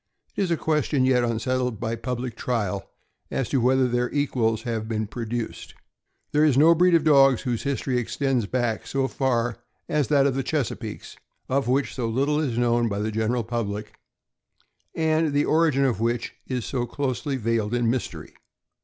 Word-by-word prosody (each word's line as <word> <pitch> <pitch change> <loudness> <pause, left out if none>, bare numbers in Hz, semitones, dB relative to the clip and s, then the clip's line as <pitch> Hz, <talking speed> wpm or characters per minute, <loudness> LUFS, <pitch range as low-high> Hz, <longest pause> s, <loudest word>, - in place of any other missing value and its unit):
It - - -1
is 190 - +1
a 170 - +1
question 150 -4 +1
yet 125 -2 +3
unsettled 125 0 -1
by 115 0 -2
public 125 0 -4
trial 105 -6 -2 0.4
as 135 - -2
to 135 - +1
whether 130 +1 +3
their 120 0 0
equals 120 -6 0
have 115 -3 -3
been 110 -1 -1
produced. 115 +2 -5 0.6
There 150 +1 +3
is 145 -4 +4
no 160 +4 +7
breed 175 +1 +4
of 165 - +3
dogs 135 -5 +5
whose 120 -3 -1
history 135 -2 -1
extends 125 -1 -1
back 120 -2 -1
so 135 -1 0
far 120 -4 0 0.3
as 150 -3 +1
that 140 -2 +4
of 140 - +2
the 135 - -1
Chesapeakes 140 -2 -4 0.3
of 135 0 +1
which 135 +3 +1
so 120 -3 -2
little 140 +6 +1
is 130 -7 -1
known 120 -1 +2
by 100 - -3
the 105 +2 -1
general 110 +2 0
public, 105 -2 -4 1.0
and 160 -1 +1
the 145 +1 +2
origin 155 -4 +3
of 120 -7 0
which 115 +1 -1
is 125 -4 -3
so 120 -3 -2
closely 135 0 -2
veiled 115 -2 0
in 120 -1 +1
mystery. 125 +2 -3
125 Hz, 175 wpm, -25 LUFS, 115-140 Hz, 1.0 s, no